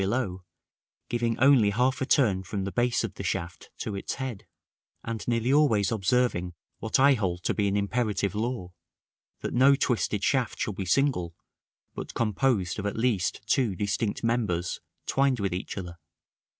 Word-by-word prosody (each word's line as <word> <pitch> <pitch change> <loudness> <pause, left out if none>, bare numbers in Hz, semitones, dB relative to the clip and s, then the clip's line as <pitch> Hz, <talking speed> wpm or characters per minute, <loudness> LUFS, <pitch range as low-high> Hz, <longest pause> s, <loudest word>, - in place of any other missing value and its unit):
below, 95 -3 -1 0.7
giving 120 -1 0
only 130 -5 +5
half 125 +6 +1
a 130 - 0
turn 105 -11 +3
from 95 +2 -4
the 100 - -3
base 120 +2 +1
of - - -4
the - - -7
shaft 85 +1 -4
to 105 - -4
its 100 - -4
head, 130 -7 -6 0.6
and 115 -2 -5
nearly 120 +2 +1
always 120 -10 +3
observing 100 -4 +1 0.2
what 110 +4 0
I 140 +1 +6
hold 90 -7 -2
to - - +1
be 105 -2 +1
an 100 +1 +1
imperative 100 -1 0
law, 110 -4 -3 0.7
that - - -3
no 135 +3 +6
twisted 115 -6 0
shaft 130 -5 +1
shall 105 - -1
be 95 0 -4
single, 90 -9 +1 0.6
but - - -7
composed 105 -4 0
of 105 - -2
at 100 - -4
least 110 -6 0
two 110 -2 +1
distinct 100 +3 -2
members, 110 -7 -1 0.2
twined 135 -2 +2
with 100 -3 -1
each 90 +3 -5
other. 90 -2 -7
110 Hz, 165 wpm, -27 LUFS, 95-125 Hz, 0.7 s, I